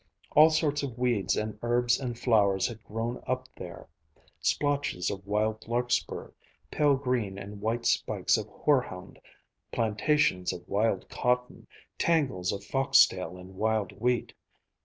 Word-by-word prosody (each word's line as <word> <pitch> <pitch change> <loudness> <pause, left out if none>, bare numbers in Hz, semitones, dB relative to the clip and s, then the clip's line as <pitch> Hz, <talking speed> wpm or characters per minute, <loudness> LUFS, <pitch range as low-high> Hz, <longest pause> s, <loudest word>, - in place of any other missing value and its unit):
All 155 +2 +7
sorts 155 -2 +1
of 130 -4 -5
weeds 120 -5 +1
and 105 0 -3
herbs 120 +1 +2
and 125 -4 -4
flowers 100 -6 +3
had 115 -2 -5
grown 115 +3 -4
up 130 0 -2
there; 90 -2 -9 0.5
splotches 145 -11 0
of 95 0 -7
wild 110 +2 -1
larkspur, 120 +1 -1 0.4
pale 145 -2 +3
green 125 -7 -1
and 100 +1 -8
white 115 +2 -1
spikes - - +2
of - - -3
hoarhound, - - -1 0.5
plantations 110 -3 +1
of 90 -1 -10
wild 105 +3 0
cotton, 125 0 -1 0.3
tangles 135 - +1
of 100 - -5
foxtail 100 -10 +3
and 90 +1 -12
wild 110 +1 0
wheat. 120 +4 -1
115 Hz, 135 wpm, -28 LUFS, 100-130 Hz, 0.5 s, All